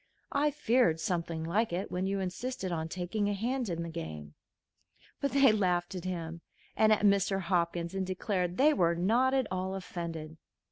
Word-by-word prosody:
I 290 Hz, +1 st, +2 dB
feared 245 Hz, -, +2 dB
something 165 Hz, -1 st, -2 dB
like 205 Hz, +7 st, 0 dB
it 180 Hz, +3 st, -3 dB
when 185 Hz, +1 st, -1 dB
you 195 Hz, 0 st, -1 dB
insisted 190 Hz, +2 st, -3 dB
on 160 Hz, -1 st, -2 dB
taking 185 Hz, +4 st, -1 dB
a 205 Hz, -, 0 dB
hand 240 Hz, +3 st, -1 dB
in 170 Hz, -1 st, -2 dB
the 170 Hz, -, -5 dB
game." 75 Hz, -, -7 dB, 0.9 s
But 280 Hz, -, 0 dB
they 275 Hz, -3 st, +6 dB
laughed 180 Hz, -4 st, +1 dB
at 180 Hz, -1 st, -6 dB
him 170 Hz, -2 st, -4 dB, 0.3 s
and 220 Hz, 0 st, +4 dB
at 215 Hz, -, +4 dB
Mr. 200 Hz, -1 st, +3 dB
Hopkins, 170 Hz, -1 st, 0 dB
and 195 Hz, 0 st, -1 dB
declared 185 Hz, -1 st, -2 dB
they 300 Hz, +3 st, +5 dB
were 170 Hz, -7 st, +2 dB
not 235 Hz, +10 st, +2 dB
at 265 Hz, -2 st, +2 dB
all 185 Hz, +1 st, -2 dB
offended. 165 Hz, -4 st, -6 dB
185 Hz, 180 wpm, -31 LUFS, 170-215 Hz, 0.9 s, they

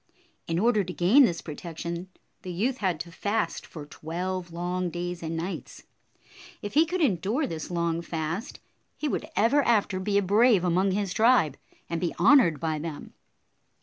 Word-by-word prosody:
In 165 Hz, -, -1 dB
order 215 Hz, +1 st, +3 dB
to 180 Hz, 0 st, -6 dB
gain 215 Hz, +12 st, +6 dB
this 170 Hz, -6 st, -2 dB
protection, 170 Hz, +2 st, -6 dB, 0.3 s
the 185 Hz, -, -6 dB
youth 235 Hz, +9 st, -1 dB
had 185 Hz, -7 st, -1 dB
to 170 Hz, -, -8 dB
fast 205 Hz, 0 st, -2 dB
for 150 Hz, -3 st, -9 dB
twelve 175 Hz, +4 st, -5 dB
long 180 Hz, +1 st, -2 dB
days 175 Hz, 0 st, -4 dB
and 165 Hz, 0 st, -4 dB
nights. 175 Hz, +4 st, -6 dB, 0.8 s
If 205 Hz, -, -5 dB
he 315 Hz, +3 st, +4 dB
could 360 Hz, +2 st, -2 dB
endure 225 Hz, -, +1 dB
this 160 Hz, -, -5 dB
long 170 Hz, -1 st, -1 dB
fast, 165 Hz, -, -4 dB, 0.4 s
he 305 Hz, -, -2 dB
would 305 Hz, -, -2 dB
ever 255 Hz, +7 st, +4 dB
after 210 Hz, -7 st, +2 dB
be 200 Hz, +2 st, 0 dB
a 200 Hz, -, +3 dB
brave 210 Hz, 0 st, +4 dB
among 180 Hz, +2 st, +2 dB
his 195 Hz, -1 st, -1 dB
tribe, 220 Hz, -, +4 dB, 0.3 s
and 170 Hz, -1 st, -3 dB
be 175 Hz, -, -1 dB
honored 180 Hz, -, +5 dB
by 160 Hz, 0 st, -1 dB
them. 155 Hz, -1 st, -7 dB
180 Hz, 170 wpm, -27 LUFS, 170-215 Hz, 0.8 s, gain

